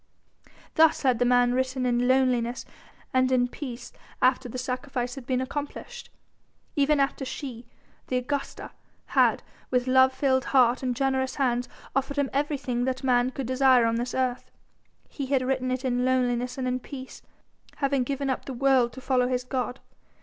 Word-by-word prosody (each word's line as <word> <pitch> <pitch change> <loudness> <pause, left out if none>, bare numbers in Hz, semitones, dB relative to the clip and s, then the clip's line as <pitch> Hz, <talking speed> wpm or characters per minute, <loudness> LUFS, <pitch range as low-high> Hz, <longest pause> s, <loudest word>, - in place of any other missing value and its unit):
Thus 320 -1 +4
had 255 -4 +2
the 245 - +3
man 245 0 +4
written 260 0 -1
in 245 0 +1
loneliness 255 -2 +1 0.5
and 255 0 +3
in 245 -1 +3
peace 245 -2 -8 0.3
after 255 0 +2
the 255 - -6
sacrifice 255 0 -3
had 270 -3 -9
been 255 -1 0
accomplished, 290 - -6 0.7
even 290 +1 +3
after 275 0 0
she 255 -3 -6 0.4
the 255 - 0
Augusta 275 +3 -4 0.4
had, - - +3 0.3
with 250 -1 +1
love 260 0 +5
filled 260 -1 +1
heart 250 -2 +3
and 250 -2 -1
generous 265 0 0
hands, 245 -3 0 0.3
offered 275 +1 -1
him 285 -2 0
everything 270 -4 -1
that 260 +1 -2
man 250 -1 +3
could 265 0 -5
desire 255 -1 +4
on 230 0 +1
this 245 +1 -3
earth. 255 -1 -1 0.6
He 275 -3 -5
had 265 -1 +1
written 255 0 -1
it 255 +1 -2
in 245 -1 +1
loneliness 250 -1 0
and 260 -1 -2
in 250 0 -1
peace, 260 0 -9 0.5
having 275 -2 +1
given 275 +2 -2
up 260 - -2
the 270 - -5
world 255 -2 +3
to 260 - -9
follow 250 -1 +2
his 250 0 -1
God. 250 0 -3
255 Hz, 170 wpm, -26 LUFS, 250-270 Hz, 0.7 s, love